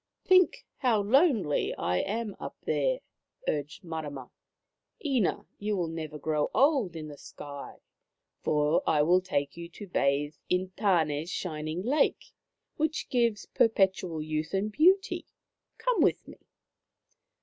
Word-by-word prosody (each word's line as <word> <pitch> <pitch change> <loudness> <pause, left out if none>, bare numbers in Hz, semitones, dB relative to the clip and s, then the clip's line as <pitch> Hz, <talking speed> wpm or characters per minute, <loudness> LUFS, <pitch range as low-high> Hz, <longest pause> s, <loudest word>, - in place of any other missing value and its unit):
" - - -58
Think 370 -1 +4
how 230 -6 +2
lonely 230 - +3
I 90 +1 0
am 215 - -2
up - - -7
there," - - +1 0.5
urged 150 +6 -2
Marama. 150 -6 -6 0.4
" 470 - -27
Ina, 260 -9 +1
you 210 0 -1
will 170 -3 -1
never 160 -2 -5
grow 150 0 0
old 260 - +3
in 155 -1 -6
the 145 -1 -10
sky, 140 -1 -9 0.6
for 150 +1 +2
I 150 -2 +4
will 180 +4 +4
take 145 -7 -2
you 170 0 -8
to 205 +4 -9
bathe 145 -4 +1 0.2
inTan6's 180 -4 +1
shining 155 0 -3
lake, 275 +7 +1 0.4
which 310 0 -1
gives 235 -5 +1
perpetual 190 -7 +1
youth 155 +2 -2
and 205 +3 0
beauty. 370 - +3 0.5
Come 480 +1 +1
with - - +2
me." - - -12
180 Hz, 135 wpm, -29 LUFS, 155-230 Hz, 0.6 s, Think